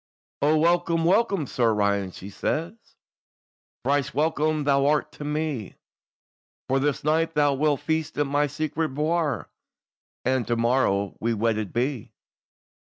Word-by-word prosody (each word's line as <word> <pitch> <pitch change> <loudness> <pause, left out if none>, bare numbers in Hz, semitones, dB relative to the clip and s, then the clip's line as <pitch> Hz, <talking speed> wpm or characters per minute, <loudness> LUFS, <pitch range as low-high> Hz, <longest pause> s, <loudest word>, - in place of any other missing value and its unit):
"O 150 +2 +4
welcome, 170 0 +2
welcome, 195 -3 +2
Sir 115 -4 +1
Roland," 100 -2 0
she 100 +2 -9
says, 165 - -2 1.1
"Thrice 140 0 0
welcome 155 0 +1
thou 140 -1 +3
art 150 0 +1
to - - -9
me; 150 -7 -3 0.9
For 135 +1 +2
this 145 +1 -1
night 160 +2 +1
thou 145 -1 +3
wilt 145 0 +1
feast 160 -1 -2
in 145 -1 +1
my 145 +1 +1
secret 155 0 -3
bouir, 155 0 0 0.8
And 130 -1 +1
to 120 - +1
morrow 115 -5 +1
we'll 115 0 -1
wedded 110 -2 0
be." 125 -1 -2
145 Hz, 135 wpm, -25 LUFS, 120-155 Hz, 1.1 s, O